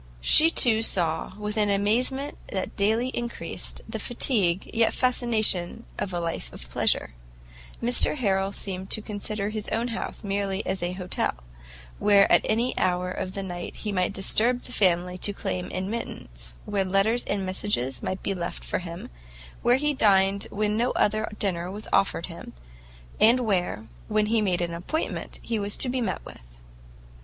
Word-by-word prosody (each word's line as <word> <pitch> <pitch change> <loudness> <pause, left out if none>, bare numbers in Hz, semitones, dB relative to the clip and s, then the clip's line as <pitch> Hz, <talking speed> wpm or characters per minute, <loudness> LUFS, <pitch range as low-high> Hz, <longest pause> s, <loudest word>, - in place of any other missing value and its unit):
She 310 - +7 0.3
saw, 170 -7 +2
too, 195 - -15
with 210 +1 -3
an 210 -1 +2
amazement 245 +8 0 0.2
that 190 -1 -4
daily 220 +5 +1
increased, 240 -2 -1
the - - -5
fatigue, 205 -8 +1
yet 225 -1 +2
fascination 225 -6 +4
of 190 - -2
a 175 - -2
life 165 - -4
of - - -9
pleasure: 60 - 0 0.7
Mr 245 +4 +3
Harrel 195 -6 0
seemed 190 -1 -3
to 215 - +1
consider 210 -1 -3
his 215 -1 -5
own 235 +2 -1
house 230 - -4
merely 200 0 -2
as 190 0 -2
an 175 +1 -2
hotel, 185 - -1 0.6
where 200 -1 +5
at - - +6
any 235 +3 +1
hour 180 0 0
of 185 0 -5
the 195 - -4
night 175 -2 -6
he 210 - -5
might 185 -2 0
disturb 230 +5 +2
the - - -8
family 180 -4 +1
to 205 - +3
claim 180 -2 -4
admittance, 185 - -5
where 200 -2 0
letters 195 +5 +1
and 200 -1 -2
messages 185 -10 -1
might 185 - -4
be 195 - 0
left 175 -2 -5
for - - -2
him, 170 -1 -8 0.5
where 240 +1 +4
he 295 +2 +1
dined 195 -4 +3
when 210 0 -1
no 240 +3 +1
other 215 +1 +1
dinner 180 -3 -2
was 205 +3 -6
offered 180 -4 +2
him, 170 -2 -10 0.7
and 235 +4 +5
where, 180 - -1 0.2
when 215 0 +1
he 220 +1 +1
made 180 -4 0
an 170 -1 -2
appointment, 180 - -4
he 230 -2 -2
was 205 0 -1
to 255 - +4
be 255 0 -1
met 145 - -3
with. - - -12
200 Hz, 170 wpm, -25 LUFS, 185-225 Hz, 0.7 s, She